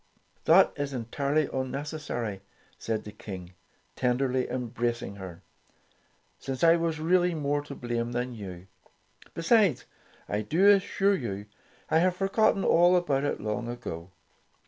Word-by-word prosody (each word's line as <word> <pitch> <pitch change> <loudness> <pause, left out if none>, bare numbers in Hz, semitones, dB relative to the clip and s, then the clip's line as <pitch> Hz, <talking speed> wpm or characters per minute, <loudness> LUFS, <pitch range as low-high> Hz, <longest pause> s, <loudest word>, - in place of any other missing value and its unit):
"That - - +6
is 140 -1 -3
entirely 140 +5 0
unnecessary," 130 -6 -3 0.4
declared 110 -1 -2
the 105 - -8
King, 95 -4 -9 0.4
tenderly 130 +1 0
embracing 120 -4 -3
her, 95 -1 -9 1.0
"since 135 +2 -4
I 165 0 +7
was 165 -2 -1
really 175 +2 +2
more 145 -1 0
to 145 -1 -9
blame 120 -1 -3
than 125 +1 -2
you. 95 -5 -8 0.7
Besides, 170 - +3 0.4
I 105 - -1
do 165 - +2
assure 200 0 +3
you, 105 - -3 0.5
I 160 - +5
have 180 +1 +2
forgotten 195 +1 +2
all 175 +2 +5
about 145 -6 +1
it - - -1
long 110 +3 -3
ago. 90 -8 -6
130 Hz, 130 wpm, -28 LUFS, 115-165 Hz, 1.0 s, I